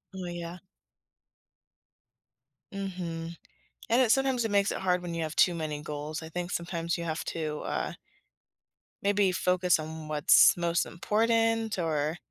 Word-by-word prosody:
Oh 185 - -5
yeah. 175 0 -6 2.2
Mhm. 170 -4 -5 0.5
And 240 +3 +4
it 235 - +4
sometimes 265 -2 +2
it 215 - -2
makes 200 0 +3
it - - -2
hard 180 -1 +1
when 175 -1 -5
you 165 -1 -2
have 155 - -5
too 180 - +5
many 150 -2 -4
goals. 150 +1 -5
I 160 - -8
think 180 +1 -4
sometimes 170 -1 -2
you 170 - -4
have 160 0 -3
to, 155 -2 -3
uh - - -3 1.1
maybe 200 -1 +2
focus 180 -1 +2
on 155 0 -7
what's 150 -1 +6
most 170 0 +1
important 225 +3 +1
or 160 -1 -1
175 Hz, 145 wpm, -29 LUFS, 160-195 Hz, 2.2 s, what's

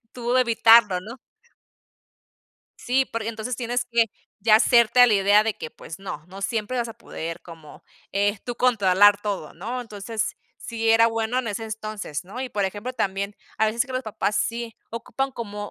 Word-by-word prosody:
tú 240 -1 -3
de 255 - +5
evitarlo, 225 -5 +5
¿no? 230 +7 -10 1.6
Sí, 260 +2 +1
porque, 230 -3 -4
entonces, 230 +2 -4
tienes 245 0 -1
que 235 -1 +3 0.3
ya 215 +1 +6
hacerte 235 +1 +4
a 245 - +10
la 225 - +3
idea 200 +1 +5
de 220 -1 -1
que, 155 - -7
pues, 165 - -10
no, 185 -6 -7
no 190 +2 -10
siempre 225 +3 -2
vas 240 -1 -1
a - - -7
poder 165 +1 -7
como, 165 -3 -13 0.3
eh, 205 +1 +1
tú 245 - -4
controlar 205 -4 +4
todo, 200 -7 -4
¿no? 235 +9 -5
Entonces 220 -1 -4 0.2
sí 225 -1 -3
era 225 +1 +6
bueno 225 +2 -1
en 240 - -5
ese 210 +2 -4
entonces, 215 -8 -5
¿no? 205 +8 -8
Y 260 - -3
por 205 -4 -1
ejemplo, 205 +6 -4
también, 200 -1 -2 0.2
a 220 - +4
veces 230 +3 0
que 265 - -9
los 255 0 -2
papás 210 -2 -2
sí 235 -1 -2 0.2
ocupan 270 +4 -3
como 205 -4 -6
220 Hz, 185 wpm, -24 LUFS, 200-235 Hz, 1.6 s, a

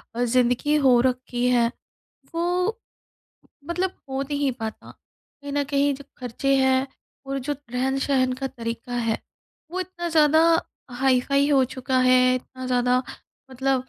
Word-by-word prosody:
अ, 245 - 0
ज़िंदगी 250 +4 +2
हो 245 -2 +6
रखी 250 -1 -2
है, 235 -1 +3 0.6
वो 360 +6 0 0.9
मतलब 360 +2 0 0.2
हो 265 0 -2
नहीं 285 -1 -1
पाता। 220 -1 -6 0.5
कहीं 285 0 -7
न 285 0 +1
कहीं 280 0 +1
जो 280 - -12
खर्चे 255 +3 -1
हैं 265 0 +3 0.4
और 275 0 -3
जो 290 - +1 0.2
रहन-सहन 265 0 +1
का 270 +1 -3
तरीका 235 0 -6
है, 230 -2 0 0.5
वो 370 - -3
इतना 345 -2 -4
ज़्यादा 315 -1 +5 0.6
हाई-फाई 270 +2 +2
हो 275 -2 +5
चुका 260 0 -1
है, 255 0 +5
इतना 255 0 -7
ज़्यादा 250 0 +2 0.5
मतलब 260 0 0
265 Hz, 140 wpm, -24 LUFS, 250-285 Hz, 0.9 s, हो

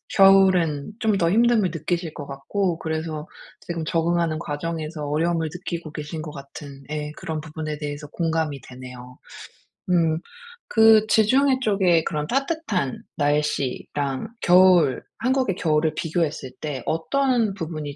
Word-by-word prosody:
겨울엔 190 -5 +5
좀 220 -3 +2
더 170 - +2
힘듦을 225 -2 +3
느끼실 165 0 -3
것 145 - -6
같고 165 +6 -2
그래서 160 0 -4 0.3
지금 170 -2 -4
적응하는 165 -1 0
과정에서 155 0 -4
어려움을 160 +1 0
느끼고 170 -3 -5
계신 155 0 -6
것 150 - -7
같은 140 0 -10
예 150 -1 -4
그런 160 -1 -4
부분에 155 0 -5
대해서 145 0 -6
공감이 160 -3 -1
되네요. 125 0 -11 0.7
음. 165 -3 +3 0.5
그 220 -1 +6
지중해 260 +5 +3
쪽에 190 -7 +3
그런 150 -1 -2
따뜻한 265 - -1
날씨랑 145 - -1
겨울, 180 -6 +5 0.2
한국의 255 -5 +1
겨울을 155 -2 +1
비교했을 155 -5 -2
때 145 -5 -4
어떤 240 - +1
부분이 155 -5 -5
160 Hz, 290 characters per minute, -23 LUFS, 150-190 Hz, 0.7 s, 그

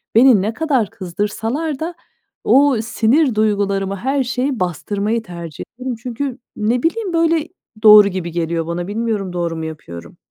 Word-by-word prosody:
beni 235 -4 +6
ne 215 +3 -1
kadar 270 -10 0
kızdırsalar 225 - -3
da 335 +2 -4 0.5
o 275 -2 +4
sinir 235 +3 +2
duygularımı, 200 -2 0
her 265 +6 0
şeyi 250 +1 -2
bastırmayı 205 +6 -1
tercih 170 -5 -8 0.2
ederim. 255 -1 -3
Çünkü 255 +1 -4 0.2
ne 230 +3 0
bileyim 375 +2 -1
böyle 330 -1 +2 0.4
doğru 210 -1 +9
gibi 180 -3 -4
geliyor 165 -1 -2
bana. 175 +1 -3
Bilmiyorum, 210 -3 -2
doğru 170 -2 -2
mu 160 - -4
yapıyorum? 120 - -9
220 Hz, 145 wpm, -18 LUFS, 185-265 Hz, 0.5 s, doğru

